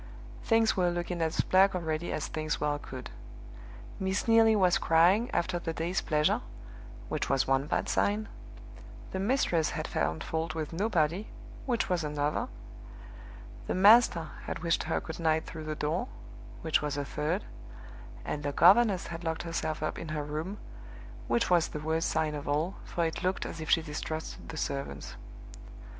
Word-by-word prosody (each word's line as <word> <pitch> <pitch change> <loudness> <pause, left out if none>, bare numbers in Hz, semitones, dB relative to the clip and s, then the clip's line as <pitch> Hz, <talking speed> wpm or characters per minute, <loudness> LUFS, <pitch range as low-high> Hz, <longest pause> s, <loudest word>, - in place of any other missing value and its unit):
Things 225 -1 +3
were 180 -2 +2
looking 175 0 -3
as 160 -1 +1
black 190 +1 +4
already 165 -1 -2
as 155 - -2
things 155 -1 -3
well 145 0 0
could. 130 -3 -8 0.9
Miss 190 +3 -1
Neelie 225 -1 +6
was 185 -4 +4
crying, 180 +8 +4
after 175 0 -1
the 165 -1 -3
day's 170 +4 -1
pleasure 165 +9 +1 0.7
(which - - -2
was 135 -1 +2
one 135 +1 +1
bad - - -1
sign); 210 +2 +1 0.8
the 190 - -3
mistress 195 - +1
had - - -3
found 80 +3 -1
fault 160 0 -3
with 155 -1 -4
nobody 180 0 0 0.4
(which 240 -3 +1
was 180 -2 0
another); 150 +9 -1 1.2
the - - -1
master 195 -4 +6
had - - -5
wished 165 -1 +1
her - - 0
good 160 +1 -7
night 160 -1 +1
through 155 -1 -8
the 155 0 -3
door 160 +11 -1 0.6
(which 160 -1 +2
was 145 -1 -2
a 145 - -2
third); 155 +8 -2 0.8
and 150 - -3
the 145 0 -2
governess 195 +4 +5
had 170 0 -7
locked 160 -1 -2
herself 160 -2 -3
up 155 - -2
in - - -6
her 155 -1 -3
room 155 +7 -4 0.7
(which 235 -5 +1
was 175 -2 +4
the 150 - -6
worst 160 +2 0
sign 155 -1 0
of 145 -1 -6
all, 155 +6 0
for 170 - -1
it 160 - -3
looked 185 +1 -1
as 165 - -6
if 155 - -6
she 165 - +4
distrusted 155 +1 -5
the 160 - -6
servants). 135 - -4
165 Hz, 170 wpm, -30 LUFS, 155-185 Hz, 1.2 s, Neelie